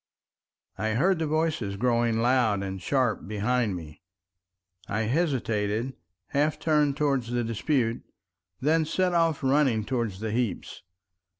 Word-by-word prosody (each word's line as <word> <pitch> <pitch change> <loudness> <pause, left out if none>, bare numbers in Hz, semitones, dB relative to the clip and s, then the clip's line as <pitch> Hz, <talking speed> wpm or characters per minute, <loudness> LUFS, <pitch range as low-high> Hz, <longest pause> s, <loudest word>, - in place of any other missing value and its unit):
I 110 0 0
heard 180 +7 +2
the 160 - 0
voices 155 -10 -1
growing 115 0 +1
loud 120 -5 +2
and 95 -1 -5
sharp 125 -1 0
behind 110 0 0
me. 80 -3 -9 0.9
I 105 - -1
hesitated, 115 -4 0 0.4
half 150 +2 +1
turned 150 -3 +2
towards 140 -5 0
the 120 0 0
dispute, 115 +2 0 0.6
then 160 +4 +2
set 180 +3 0
off 165 -4 +1
running 130 -5 +2
towards 115 -7 -2
the 110 0 -3
heaps. 120 -2 -2
125 Hz, 125 wpm, -27 LUFS, 110-150 Hz, 0.9 s, heard